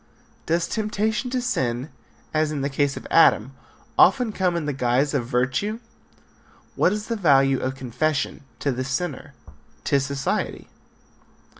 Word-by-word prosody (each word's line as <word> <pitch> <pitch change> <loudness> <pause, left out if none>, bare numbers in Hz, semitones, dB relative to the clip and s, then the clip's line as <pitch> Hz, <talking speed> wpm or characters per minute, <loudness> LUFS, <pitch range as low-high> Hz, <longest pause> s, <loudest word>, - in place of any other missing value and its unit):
Does 170 +1 +1
temptation 220 +3 -1
to 250 0 -1
sin, 130 - -1 0.4
as 155 0 +1
in 145 -2 -3
the 140 +1 -2
case 140 0 0
of - - -8
Adam, 130 -6 +5 0.5
often 250 -4 +5
come 185 -4 0
in 170 -3 -2
the 145 - -1
guise 130 +3 +1
of 125 -5 -1
virtue? 130 - 0 1.0
What 180 - +3
is 210 +1 -3
the 230 - -2
value 135 - +4
of 130 +1 -2
confession 135 +4 -2 0.2
to 140 - +1
the 130 +1 -2
sinner? 140 +2 -4 0.5
To 140 - +2
society? 140 0 -2
145 Hz, 145 wpm, -24 LUFS, 130-190 Hz, 1.0 s, Adam